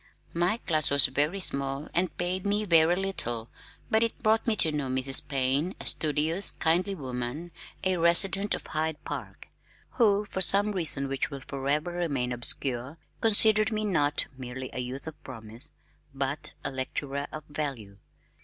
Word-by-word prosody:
My 175 +6 +1
class 155 -9 +1
was 140 -1 +9
very 150 +8 0
small 140 -4 -2
and 180 +1 0
paid 180 +1 -2
me 205 +1 +1
very 165 -2 +4
little 120 -12 -2 0.4
but 220 - +4
it 230 -1 -2
brought 220 +2 +2
me 225 - +3
to 160 -6 +4
know 145 -3 -3
Mrs. 130 +2 +3
Payne, 140 +5 -1
a - - -8
studious, 155 +5 0
kindly 180 +4 0
woman 130 +3 -5 0.3
(a 185 -1 +1
resident 195 +4 +4
of - - -10
Hyde 155 0 -2
Park), - - -8 0.4
who 210 -3 +2
for 190 -2 -5
some 200 +3 +4
reason 160 -7 +2
which 135 0 -2
will 140 -1 -8
forever 140 +5 -2
remain 145 -8 -2
obscure, 125 +3 -1 0.2
considered 215 -1 +4
me 215 0 -2
not 145 -7 +2
merely 130 0 -7
a - - -5
youth 125 +2 -6
of 160 -1 -10
promise, 115 -2 -5 0.5
but 140 +3 -1
a - - -2
lecturer 140 +2 -4
of 155 - -7
value. 135 -10 -6
155 Hz, 160 wpm, -27 LUFS, 135-185 Hz, 0.5 s, was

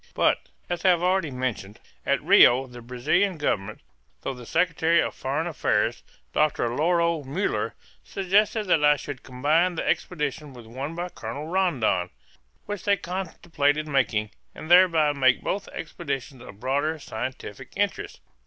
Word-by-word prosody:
But, - - +1 0.2
as 175 -1 -3
I 190 - +5
have 175 -1 +3
already 180 -3 +2
mentioned, 125 -6 -4 0.3
at - - +1
Rio 130 +2 +6
the 120 -1 -11
Brazilian 160 +11 0
Government, 110 -8 -2 0.4
through - - -2
the 125 -2 -11
secretary 165 -1 +2
of - - 0
foreign 140 +5 -2
affairs, 165 -5 0 0.3
Doctor 150 -5 +1
Lauro 170 +1 +2
Muller, 150 +10 -2 0.3
suggested 205 +3 +1
that 165 -5 +2
I 150 0 +6
should 145 -2 -7
combine 155 +8 +1
the - - -3
expedition 150 -3 -2
with 120 -2 -11
one 135 +8 -6
by 175 +1 -4
Colonel 130 +1 -6
Rondon, 145 - +1 0.6
which 205 -3 -5
they 200 -1 +3
contemplated 165 -5 -1
making, 120 -7 0 0.2
and 160 - -7
thereby 165 -5 +6
make 130 -2 +3
both 200 0 -2
expeditions 140 -5 -6
of 100 -4 -12
broader 145 +6 0
scientific 120 -6 -7
interest. - - -2
150 Hz, 145 wpm, -25 LUFS, 130-175 Hz, 0.6 s, Rio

